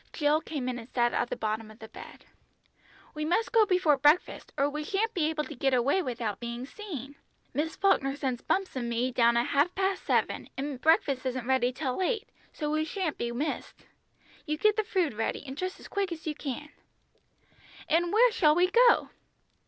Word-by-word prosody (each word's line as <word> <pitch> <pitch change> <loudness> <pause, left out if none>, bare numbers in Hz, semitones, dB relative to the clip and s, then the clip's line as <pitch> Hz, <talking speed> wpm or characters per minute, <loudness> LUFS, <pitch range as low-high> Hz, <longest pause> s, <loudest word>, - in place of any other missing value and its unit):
Jill 300 0 +2
came 280 -7 -4
in 250 -1 -2
and 230 +1 -11
sat 240 -1 +1
on - - 0
the - - -2
bottom 215 0 -3
of 215 - -14
the 220 - -10
bed. - - -12 0.9
"We 305 - -4
must 355 +9 0
go 450 -3 +5
before 360 -7 +3
breakfast, 295 +6 +2
or 280 0 +3
we 300 +1 -4
shan't 420 +8 -1
be 315 -4 +1
able 310 -1 -1
to 300 - -8
get 270 0 +1
away 275 +10 +2
without 235 - -3
being 235 +1 -5
seen. 285 - -8 0.4
Miss 310 +4 -1
Falkner 325 -9 +2
sends 260 -4 -2
Bumps 385 -4 -1
and 240 -2 -2
me 240 +2 0
down 235 -1 +3
at 235 - +2
half 290 +6 +1
past 385 0 0
seven, - - 0
and 275 -2 -4
breakfast 285 -4 +3
isn't 255 -2 -3
ready 255 -1 +2
till 260 +3 -3
eight, 445 +3 -1 0.2
so 300 -2 -3
we 310 0 +1
shan't 325 0 -3
be 235 0 -2
missed. 275 +6 -4 0.6
You 305 0 -1
get 425 +5 +3
the 435 - +1
food 365 - 0
ready 225 +1 -2
and 265 -1 -7
dress 370 +5 -4
as - - -11
quick 395 -2 -2
as 320 -1 -7
you 310 - -1
can." 295 0 -6 1.2
"And 340 +2 +2
where 475 +3 +5
shall 310 -9 +4
we 360 +2 +3
go?" 485 +1 +5
295 Hz, 200 wpm, -29 LUFS, 255-360 Hz, 1.2 s, go